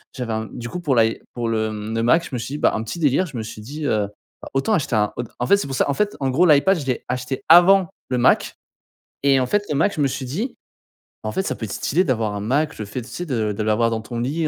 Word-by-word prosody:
j'avais 125 -4 -3
un 110 0 -1
m - - -12
du 120 - -5
coup, 180 - -5
pour 145 -6 +1
l'i 115 -1 +3 0.2
pour 120 -1 -2
le, 110 -1 0
hem, 110 +1 -5
le 115 - 0
Mac, 165 +8 +4
je - - -16
me - - -2
suis 135 +5 -5
dit, - - -3
bah, - - +4
un 110 - -1
petit 115 - -6
délire, 150 +4 +2
je 135 -7 -8
me 110 - -3
suis 110 0 -8
dit, 145 +6 -6
heu: 105 -2 +1 0.5
«Autant 215 +11 +1
acheter 145 - 0
un» 105 -1 +1
en 120 - -1 0.2
en 120 - 0
fait, 200 - +6
c'est 170 - -3
pour 135 - -4
ça, - - +2
en 140 - +2
fait, 210 +6 -1
en 135 - +1
gros 170 +8 +4
l'Ipad 165 +4 +4
je 140 - -6
l'ai 125 - -2
acheté 125 +1 -3
avant 180 +1 +7 0.2
le 125 - 0
Mac - - +3 0.7
et 135 -1 +4
en 130 - 0
fait 205 +9 +1
le 150 - 0
Mac, 165 +8 +2
je 155 - -1
me 140 - +4
suis 135 0 -4
dit: 205 - -3 0.7
«En 110 - -2
fait, - - 0
ça - - -2
peut 110 - -5
être 100 - -6
stylé 175 +7 +1
d'avoir 115 -6 0
un - - -3
Mac», 145 +8 0
le 105 - -3
fait, 115 +5 -5
tu 120 - -13
sais? 175 - -5
De 110 -6 0
de 105 - -4
l'avoir 110 +2 +2
dans 110 - -1
ton 115 +2 -6
lit, 150 +7 -1
130 Hz, 305 wpm, -22 LUFS, 115-155 Hz, 0.7 s, avant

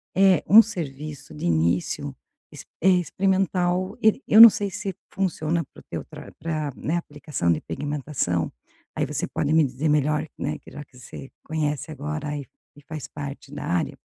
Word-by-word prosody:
eh, 190 -1 +5
um 215 +4 +10
serviço 150 - -6
de 150 - -6
início 85 - 0 0.4
ex - - -10 0.2
eh, 190 - +5
experimental. 185 +1 0
E, 220 +4 +3
eu 215 - +6
não 230 - +14
sei 200 0 -2
se 195 -1 -4 0.2
funciona 170 -3 -1
para - - -14
o - - -16
teu - - -4
tra - - -11
pra, 155 -3 -3
né, 165 +3 -1
aplicação 145 - -2
de 80 - +1
pigmentação, 135 - -2 0.4
aí - - 0
você - - -2
pode 145 - -2
me 160 0 +5
dizer 135 +4 -2
melhor, 150 +1 +1
né, 150 +2 -3
que - - -15
já 145 +2 -8
que 135 - -21
você 130 +2 -10
conhece 150 -1 -2
agora 150 0 -4
e 140 - -6 0.3
e 145 - -17
faz 155 -1 -7
parte 140 -1 -8
da 145 - -6
área. 85 -1 -1
150 Hz, 180 wpm, -24 LUFS, 140-175 Hz, 0.4 s, não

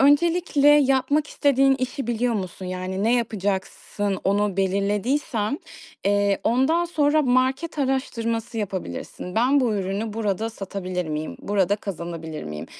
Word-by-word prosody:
öncelikle 295 +1 +4
yapmak 290 +1 +4
istediğin 275 -2 +3
işi 255 0 -3
biliyor 240 0 0
musun? 185 -2 -4
Yani, 185 +1 -3
ne 230 +2 +4
yapacaksın? 205 -2 -2
Onu 200 0 +1
belirlediysen, 205 +6 0 0.5
eee, 200 0 +2
ondan 265 +9 +3
sonra 310 -2 +2
market 260 +5 +1
araştırması 235 -4 -1
yapabilirsin. 185 - -5
"Ben 260 +5 +4
bu 235 -4 +1
ürünü 200 +3 -2
burada 220 0 -1
satabilir 185 -4 -4
miyim? 155 0 -4
Burada 200 0 +1
kazanabilir 170 -5 -6
miyim?" 75 +1 -6
220 Hz, 120 wpm, -24 LUFS, 195-270 Hz, 0.5 s, öncelikle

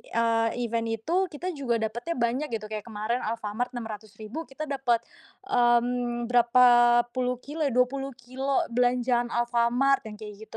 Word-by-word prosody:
eee, 230 0 +1 0.2
event 230 0 -1
itu, 335 - 0
kita 350 +4 -5
juga 265 -6 -1
dapetnya 230 +9 -3
banyak, 245 +5 0
gitu. 215 - -8
Kayak 215 +1 -6
kemarin 220 +3 -2
Alfamart 230 +3 -3
600.000 220 +5 -7
kita 285 +3 -6
dapet, 255 -5 0 0.4
mmm, 240 -5 +1
berapa 245 +1 +4 0.5
puluh 250 -1 -1
kilo 305 +3 -7
ya, - - -4
20 260 +1 0
kilo 260 +3 -1
belanjaan 245 0 +2
Alfamart 240 +2 +1
yang 210 - -9
kayak 215 0 -10
gitu, 225 - -9
240 Hz, 150 wpm, -27 LUFS, 230-260 Hz, 0.5 s, berapa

